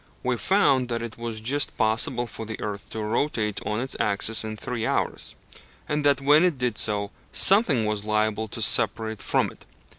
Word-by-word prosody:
We 125 0 0
found 140 - +2
that 115 -1 -2
it 115 0 -8
was 115 -2 -5
just 140 +6 0
possible 110 +2 +3
for 115 - -8
the 110 0 -6
earth 105 -1 -6
to 110 - -5
rotate 105 -2 -1
on 105 +1 -1
its 130 +2 -3
axis 105 +2 +1
in 110 0 -6
three 120 0 -4
hours, - - -1 0.5
and 150 0 -1
that 145 -2 +3
when 145 +4 +5
it 175 -6 +1
did 125 -4 0
so, 100 -2 +1 0.2
something 160 - +3
was 105 -1 -2
liable 110 +1 0
to - - -1
separate 110 -1 +2
from - - 0
it. - - -18
115 Hz, 185 wpm, -25 LUFS, 110-130 Hz, 0.5 s, when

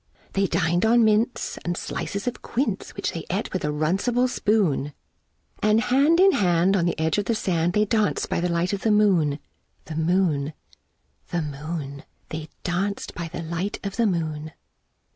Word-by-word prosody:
They 195 0 +2
dinèd 175 0 +1
on 230 +1 +5
mince, 220 +3 +1
and 175 0 -2
slices 200 0 -4
of 245 - -3
quince 230 -5 -2
Which - - -2
they 165 - -5
ate 195 +4 -2
with 185 - -2
a - - 0
runcible 190 +12 +1
spoon; 200 - +1 0.7
And 215 +1 +4
hand 280 +8 +3
in 390 +1 +7
hand, 180 - +3
on 175 -3 +2
the 170 - -1
edge 160 +5 +1
of 205 - -2
the 230 - +1
sand, 175 -5 0
They 210 +1 +3
danced 215 0 +1
by - - -1
the 180 - 0
light 170 +2 0
of 200 - -2
the 225 - +1
moon, 190 -9 +3 0.5
The 155 - -7
moon, 160 -3 +1 0.8
The 170 -2 -1
moon, 145 -1 -5 0.3
They 155 0 -6
danced 195 +3 -2
by 170 -2 -5
the 170 +1 -6
light 170 +5 -3
of 200 +1 -4
the 230 -2 +3
moon. 155 -4 -2
180 Hz, 180 wpm, -24 LUFS, 160-210 Hz, 0.8 s, in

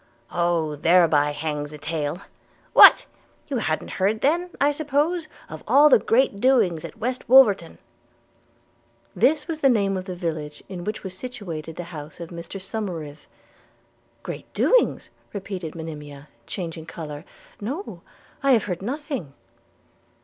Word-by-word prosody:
'Oh! 170 -3 0
thereby 160 -2 +4
hangs 145 0 -4
a 150 - -9
tale 150 +1 -3 0.3
– - - -34
What! - - +9 0.4
you 275 - -1
han't 160 -7 -2
heard 205 +3 0
then, 340 +6 +1
I 285 +1 +4
suppose, 310 +3 0 0.2
of 155 - -9
all 280 +6 +6
the 260 - +6
great 225 -3 +2
doings 220 -12 +3
at - - -9
West 250 +3 -4
Wolverton?' 215 -10 +5 1.4
This 295 +2 +2
was 320 -2 -4
the 275 - +5
name 200 -5 +2
of 185 -1 -4
the 185 -2 -5
village 155 -4 -5
in 180 -2 -7
which 210 +1 -4
was 190 -2 -7
situated 185 -9 -7
the 175 - -5
house 150 +1 -9
of 170 -1 -7
Mr 170 +3 -7
Somerive. 180 -7 -6 0.5
– - - -39
'Great - - -7
doings!' - - +2 0.2
repeated 190 -5 -6
Monimia, 150 -3 -8 0.2
changing 165 -3 -6
colour; 150 -3 -7 0.4
'no, 280 - -5 0.4
I 275 -1 +4
have 225 - +3
heard 180 -4 -3
of 195 - -6
nothing.' 275 - -4
185 Hz, 150 wpm, -24 LUFS, 160-255 Hz, 1.4 s, What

